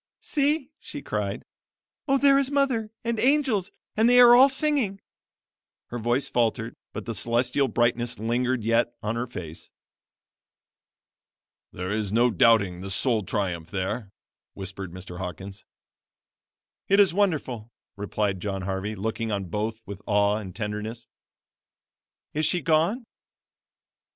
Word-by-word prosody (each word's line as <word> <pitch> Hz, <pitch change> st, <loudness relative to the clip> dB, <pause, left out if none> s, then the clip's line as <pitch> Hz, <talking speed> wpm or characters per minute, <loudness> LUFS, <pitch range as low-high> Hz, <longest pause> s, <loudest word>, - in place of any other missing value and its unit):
"See!" 295 Hz, -1 st, 0 dB
she -, -, -8 dB
cried; -, -, -3 dB, 0.6 s
"Oh, 275 Hz, 0 st, +4 dB
there 275 Hz, 0 st, +5 dB
is 275 Hz, -1 st, 0 dB
mother! 270 Hz, -6 st, +1 dB
and 235 Hz, -1 st, -1 dB
angels! 255 Hz, -8 st, +2 dB, 0.3 s
and 225 Hz, +2 st, +4 dB
they 245 Hz, 0 st, +6 dB
are 240 Hz, -1 st, +9 dB
all 265 Hz, +3 st, +8 dB
singing." 270 Hz, -8 st, 0 dB, 0.9 s
Her 120 Hz, -, -4 dB
voice 120 Hz, +4 st, 0 dB
faltered, 115 Hz, 0 st, 0 dB, 0.2 s
but -, -, -6 dB
the 115 Hz, -, -3 dB
celestial 120 Hz, +6 st, +1 dB
brightness 120 Hz, +1 st, 0 dB
lingered 120 Hz, +2 st, 0 dB
yet 115 Hz, +1 st, +1 dB
on 105 Hz, +2 st, -1 dB
her 120 Hz, +2 st, -2 dB
face. 85 Hz, -8 st, -8 dB, 2.0 s
"There 90 Hz, +2 st, -5 dB
is 105 Hz, -2 st, -2 dB
no 120 Hz, +3 st, +3 dB
doubting 100 Hz, -3 st, +3 dB
the 95 Hz, -, -6 dB
soul 115 Hz, +3 st, +1 dB
triumph 90 Hz, -5 st, -3 dB
there," 100 Hz, +3 st, -3 dB, 0.5 s
whispered 95 Hz, -1 st, -7 dB
Mr. 90 Hz, 0 st, -9 dB
Hawkins. 95 Hz, +2 st, -7 dB, 1.2 s
"It 195 Hz, +1 st, +4 dB
is 195 Hz, -4 st, +5 dB
wonderful," 150 Hz, -, 0 dB, 0.3 s
replied 100 Hz, -1 st, -2 dB
John 95 Hz, 0 st, -3 dB
Harvey, 95 Hz, +2 st, -3 dB
looking 110 Hz, +2 st, -3 dB
on 100 Hz, -3 st, -3 dB
both 110 Hz, +4 st, -3 dB
with 100 Hz, 0 st, -8 dB
awe 105 Hz, 0 st, +3 dB
and 95 Hz, -4 st, -7 dB
tenderness. 110 Hz, +2 st, -4 dB, 1.3 s
"Is 155 Hz, +1 st, +1 dB
she 180 Hz, -, 0 dB
gone?" 165 Hz, -, +1 dB
115 Hz, 130 wpm, -26 LUFS, -, 2.0 s, are